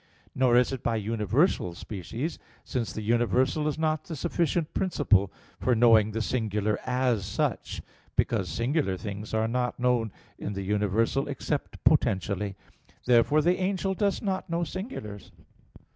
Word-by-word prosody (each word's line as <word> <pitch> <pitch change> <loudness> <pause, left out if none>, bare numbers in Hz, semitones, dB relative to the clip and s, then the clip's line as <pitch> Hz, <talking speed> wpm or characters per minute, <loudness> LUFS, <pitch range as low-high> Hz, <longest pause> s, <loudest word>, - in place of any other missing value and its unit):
Nor 125 -2 +4
is 125 +1 +3
it 135 -3 -4
by 115 - 0
universal 110 - +1
species; 110 - -5 0.2
since 120 -4 -3
the 110 - -5
universal 120 +6 +2
is 150 - -1
not 155 -1 0
the 165 - -5
sufficient 170 +1 -1
principle 110 - +2 0.3
for 125 - +2
knowing 110 -2 +5
the 110 +1 -2
singular 105 -4 0
as 125 -4 +1
such, 95 - -2 0.3
because 100 -6 +1
singular 115 - 0
things 100 +2 -6
are 110 0 +1
not 125 +1 -1
known 120 -3 +1 0.3
in 100 - -4
the 100 0 -4
universal 105 +7 +1
except 140 -2 -4
potentially. 100 +1 +2 0.5
Therefore 125 +5 +4
the 175 +3 +3
angel 190 0 0
does 200 +1 0
not 190 -2 -2
know 170 +1 0
singulars. 155 - -6
120 Hz, 145 wpm, -27 LUFS, 105-150 Hz, 0.5 s, knowing